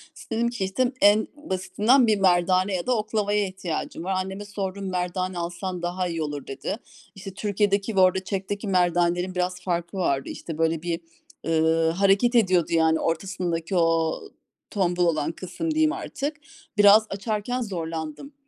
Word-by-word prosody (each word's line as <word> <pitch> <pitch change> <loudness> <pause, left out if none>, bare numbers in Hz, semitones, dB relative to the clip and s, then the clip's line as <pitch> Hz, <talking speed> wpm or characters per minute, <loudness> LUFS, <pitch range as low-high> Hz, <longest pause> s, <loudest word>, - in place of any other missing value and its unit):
İs - - -13
dedim 230 +1 +1
ki 235 -5 -3
işte, 245 +7 0
en 205 +2 +5
basitinden 225 0 +2
bir 215 -2 +3
merdane 185 +1 +3
ya 175 - -3
da 250 -2 +2
oklavaya 210 -1 0
ihtiyacım 185 -3 -5
var. 190 - -2
Anneme 190 +2 -3
sordum; 195 -1 -4
"Merdane 185 0 -2
alsan 175 +1 -4
daha 180 +1 -2
iyi 165 -2 -3
olur" 145 -2 -5
dedi. 135 +10 -4 0.4
İşte 195 0 -8
Türkiye'deki 205 +1 0
ve - - +3
orada 185 0 +4
Çek'teki 200 +2 -4
merdanenin 175 0 +1
biraz 180 0 -1
farkı 175 0 -3
vardı. 140 -7 0
İşte 165 -2 -7
böyle 165 0 +1
bir, 170 -1 -2 0.5
ııı, 160 0 +3
hareket 200 +6 +3
ediyordu 185 -7 +3
yani, 160 -1 +3
ortasındaki 170 0 -2
o 165 -2 +2 0.5
tombul 180 -3 +1
olan 155 -1 +1
kısım 185 - -4
diyeyim 310 0 +2
artık. 300 -5 -4 0.4
Biraz 205 +1 +7
açarken 215 +5 -2
zorlandım. 165 - -5
185 Hz, 155 wpm, -25 LUFS, 170-205 Hz, 0.5 s, Biraz